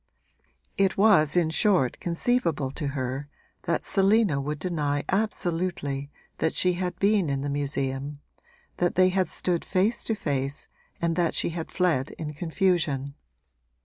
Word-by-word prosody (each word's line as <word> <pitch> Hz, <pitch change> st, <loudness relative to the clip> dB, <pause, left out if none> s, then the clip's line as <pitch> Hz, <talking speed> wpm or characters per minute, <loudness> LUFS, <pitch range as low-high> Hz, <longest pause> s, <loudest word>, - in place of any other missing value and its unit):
It 195 Hz, -1 st, +2 dB
was 195 Hz, -7 st, +5 dB
in 165 Hz, -2 st, +2 dB
short 170 Hz, -, +2 dB
conceivable 170 Hz, -, 0 dB
to 145 Hz, +1 st, -4 dB
her 130 Hz, +2 st, -3 dB, 0.4 s
that 170 Hz, -, 0 dB
Selina 195 Hz, -6 st, +3 dB
would 150 Hz, +2 st, -3 dB
deny 150 Hz, -4 st, -1 dB
absolutely 175 Hz, -8 st, -1 dB, 0.3 s
that 160 Hz, -, 0 dB
she 180 Hz, 0 st, +2 dB
had 180 Hz, 0 st, -3 dB
been 200 Hz, -5 st, +2 dB
in 135 Hz, -1 st, -1 dB
the 140 Hz, 0 st, -2 dB
museum, 140 Hz, 0 st, -2 dB, 0.6 s
that 175 Hz, 0 st, +1 dB
they 185 Hz, 0 st, +5 dB
had 185 Hz, 0 st, +1 dB
stood 175 Hz, -2 st, -1 dB
face 195 Hz, +5 st, 0 dB
to 225 Hz, -, 0 dB
face 140 Hz, -5 st, -2 dB, 0.3 s
and 170 Hz, -1 st, 0 dB
that 170 Hz, -2 st, +1 dB
she -, -, +1 dB
had 165 Hz, -1 st, -5 dB
fled 165 Hz, -8 st, +1 dB
in 150 Hz, -2 st, -5 dB
confusion. 160 Hz, -4 st, 0 dB
165 Hz, 145 wpm, -26 LUFS, 145-185 Hz, 0.6 s, was